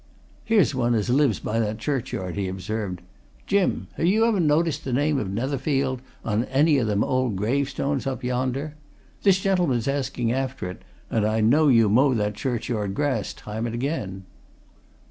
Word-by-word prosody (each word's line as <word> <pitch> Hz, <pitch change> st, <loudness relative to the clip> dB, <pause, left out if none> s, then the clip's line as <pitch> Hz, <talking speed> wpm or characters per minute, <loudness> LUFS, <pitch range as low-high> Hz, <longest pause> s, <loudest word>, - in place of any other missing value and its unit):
"Here's 220 Hz, -8 st, +3 dB
one 120 Hz, -2 st, +1 dB
as 110 Hz, +2 st, 0 dB
lives 135 Hz, -4 st, +3 dB
by 115 Hz, +2 st, -2 dB
that 110 Hz, -1 st, -1 dB
churchyard," 110 Hz, -8 st, -3 dB
he 100 Hz, -2 st, -2 dB
observed. 95 Hz, 0 st, -4 dB, 0.4 s
"Jim! 200 Hz, -1 st, +1 dB
ha' -, -, -5 dB
you 205 Hz, +7 st, +4 dB
ever 225 Hz, -4 st, +2 dB
noticed 155 Hz, -1 st, +2 dB
the 130 Hz, -, -4 dB
name 145 Hz, +2 st, +2 dB
of 105 Hz, -, -3 dB
Netherfield 130 Hz, +3 st, -1 dB, 0.2 s
on 115 Hz, +2 st, 0 dB
any 145 Hz, +3 st, +3 dB
o' -, -, +1 dB
them 105 Hz, -1 st, +1 dB
old 130 Hz, -5 st, 0 dB
gravestones 140 Hz, +6 st, -1 dB
up 130 Hz, -1 st, -3 dB
yonder? 130 Hz, +4 st, -2 dB, 0.5 s
This 195 Hz, -2 st, +4 dB
gentleman's 175 Hz, -, +1 dB
asking 135 Hz, -4 st, -1 dB
after 130 Hz, -5 st, -2 dB
it, 90 Hz, -, -12 dB, 0.3 s
and 110 Hz, -, +1 dB
I 110 Hz, +1 st, +1 dB
know 145 Hz, +8 st, +4 dB
you 115 Hz, -5 st, +5 dB
mow 130 Hz, +6 st, +4 dB
that 105 Hz, -1 st, 0 dB
churchyard 110 Hz, -3 st, -2 dB
grass 135 Hz, -6 st, -1 dB
time 110 Hz, +2 st, -5 dB
and 115 Hz, -, -4 dB
again." 115 Hz, -8 st, -3 dB
130 Hz, 165 wpm, -24 LUFS, 110-145 Hz, 0.5 s, you